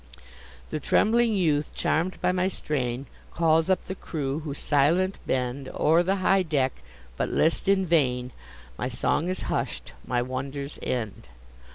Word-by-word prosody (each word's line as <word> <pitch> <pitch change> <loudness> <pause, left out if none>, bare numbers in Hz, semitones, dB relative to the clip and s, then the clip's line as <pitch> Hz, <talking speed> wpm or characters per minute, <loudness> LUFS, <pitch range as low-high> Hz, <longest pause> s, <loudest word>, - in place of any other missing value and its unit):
The 155 - -2
trembling 225 +8 +3
youth, 155 -6 +1
charm'd 175 +4 0
by - - +3
my 185 0 +1
strain, 135 -8 -2 0.3
Calls 165 0 +2
up 190 -1 +2
the 190 - -5
crew, 145 -6 -3
who, 150 -3 -5
silent, 165 +8 +2
bend 130 +1 -1
O'er 160 +3 +4
the 190 +3 +1
high 195 0 +3
deck, 140 - 0 0.4
but - - 0
list 165 +3 +1
in 195 -1 +3
vain; 130 -7 +1 0.5
My 125 - -1
song 150 +6 0
is 185 - -2
hush'd, - - -3
my 120 -1 0
wonders 135 +3 -5
end! 110 - -3
155 Hz, 150 wpm, -26 LUFS, 130-180 Hz, 0.5 s, O'er